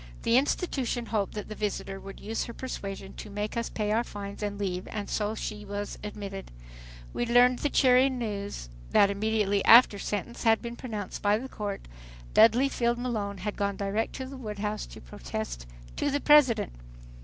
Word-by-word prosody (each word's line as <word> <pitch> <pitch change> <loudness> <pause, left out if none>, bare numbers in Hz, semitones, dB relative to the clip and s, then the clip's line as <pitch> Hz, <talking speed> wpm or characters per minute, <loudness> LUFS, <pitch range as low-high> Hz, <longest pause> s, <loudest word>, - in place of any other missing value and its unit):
The 230 - +3
institution 260 -3 +1
hoped 215 -3 -1
that 210 - -5
the 215 - -6
visitor 205 -2 -3
would 195 0 -10
use 225 +1 -3
her 235 - -8
persuasion 195 -6 -6
to 215 - -7
make 210 +1 -3
us 235 0 -1
pay 210 -1 -2
our 225 +2 +2
fines 200 -2 -7
and 205 -1 -2
leave 185 -2 -3
and 210 -2 -4
so 210 0 -1
she 210 -1 -5
was 205 0 -5
admitted. 200 -2 -6 0.6
We 240 - -1
learned 245 +1 +5
the 290 - 0
cheering 260 -1 +4
news, 205 - -4 0.3
that 200 -1 +6
immediately 205 -1 +1
after 230 -3 +8
sentence 210 +4 -4
had 225 -2 +4
been 235 0 -6
pronounced 215 -6 -5
by 205 +1 +3
the 255 +4 -6
Court, 205 -5 -5 0.5
Dudley 230 +5 +6
Field 240 -3 0
Malone 215 -5 -2
had 205 +3 -4
gone 200 -1 -1
direct 205 +3 -1
to 260 - -5
the 270 +1 -8
White 215 -5 -6
House 210 +1 -3
to - - -11
protest - - -6 0.3
to 290 - +1
the 285 +1 0
President. 285 - +5
210 Hz, 185 wpm, -28 LUFS, 200-240 Hz, 0.6 s, after